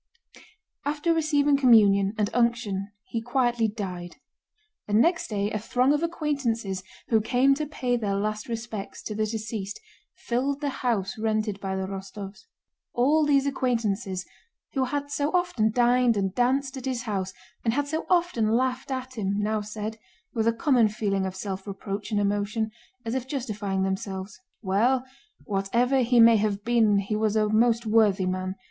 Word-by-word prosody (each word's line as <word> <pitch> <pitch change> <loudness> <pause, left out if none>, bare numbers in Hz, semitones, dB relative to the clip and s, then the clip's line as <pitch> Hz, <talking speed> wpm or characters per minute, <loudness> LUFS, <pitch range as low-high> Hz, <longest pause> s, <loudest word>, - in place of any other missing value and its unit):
After 300 +3 0
receiving 295 -3 +3
communion 210 -6 +5
and 210 -1 0
unction 230 -5 0
he 230 - -3
quietly 240 -1 +1
died; 185 -5 -6 0.7
and 210 +1 +3
next 335 +7 +2
day 205 -1 -1
a 215 - -1
throng 250 +6 +2
of 295 - 0
acquaintances 275 - -1 0.3
who 225 -2 +4
came 255 +5 +3
to 300 +2 -2
pay 250 -4 -1
their 205 -4 -1
last 215 +1 -2
respects 225 -3 -5
to 215 - -4
the 215 +1 0
deceased 215 -2 -4 0.4
filled 270 +4 -1
the 290 -1 -1
house 225 -2 -1
rented 215 -2 -1
by 190 -1 -3
the 190 - -2
Rostóvs. 195 +1 -8 0.5
All 295 +5 +3
these 280 -2 +3
acquaintances, 225 -8 -1 0.5
who 265 -2 +1
had 285 +2 -3
so 290 0 0
often 350 -12 +2
dined 245 0 +3
and 195 -2 0
danced 260 +4 +1
at 260 - -7
his 255 -2 -2
house 195 -5 -2 0.3
and 225 0 +1
had 290 0 0
so 315 +2 -3
often 345 -12 +2
laughed 255 +3 0
at 260 -2 -4
him, 200 -1 0
now 210 +1 0
said, 215 +1 -5 0.3
with 225 -1 0
a - - +5
common 235 0 +3
feeling 200 -2 -1
of 185 - -6
self 190 0 -5
reproach 200 +1 -5
and 210 -2 +1
emotion, 205 +2 0 0.3
as 225 - -2
if 260 -1 -2
justifying 210 -8 -2
themselves: 190 0 -4 0.2
"Well, 240 +7 +2 0.4
whatever 235 +7 +1
he 245 0 +3
may 230 0 +8
have 205 -1 -1
been 225 -3 +3
he 200 +2 -1
was 215 0 +1
a 215 -1 +3
most 230 +2 +3
worthy 215 -3 +3
man. 185 +1 -2
225 Hz, 165 wpm, -26 LUFS, 200-255 Hz, 0.7 s, may